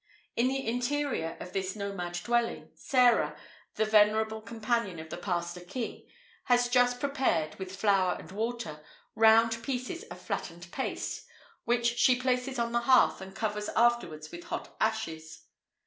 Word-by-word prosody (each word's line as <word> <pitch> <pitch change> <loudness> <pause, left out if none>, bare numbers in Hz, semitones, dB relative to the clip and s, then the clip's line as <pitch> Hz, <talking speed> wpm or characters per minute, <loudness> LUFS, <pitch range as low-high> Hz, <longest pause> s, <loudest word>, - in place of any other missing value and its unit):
In 240 +2 +3
the 270 +1 -1
interior 245 - -1
of 180 - -8
this 190 0 -2
nomad 200 -4 -4
dwelling, 235 -1 0
Sarah, 250 -2 +3 0.4
the 220 - +2
venerable 220 +1 +3
companion 225 -4 -2
of 160 0 -9
the - - -4
Pastor 175 -1 -2
King, 205 +7 -6 0.4
has 245 -1 +3
just 245 0 +3
prepared, 260 - 0
with 190 0 -6
flour 195 -2 +2
and - - -11
water, 215 -7 -4 0.3
round 225 +1 +5
pieces 255 +7 -3
of - - -10
flattened 170 0 -5
paste, 265 - -4 0.4
which 235 0 +1
she 250 -1 +5
places 255 +1 0
on 235 0 0
the 235 - +2
hearth, 250 -2 +4
and 190 0 -9
covers 210 -1 -2
afterwards 195 -10 +1
with 175 0 -9
hot - - -6
ashes. 160 -8 -2
220 Hz, 150 wpm, -30 LUFS, 185-245 Hz, 0.4 s, round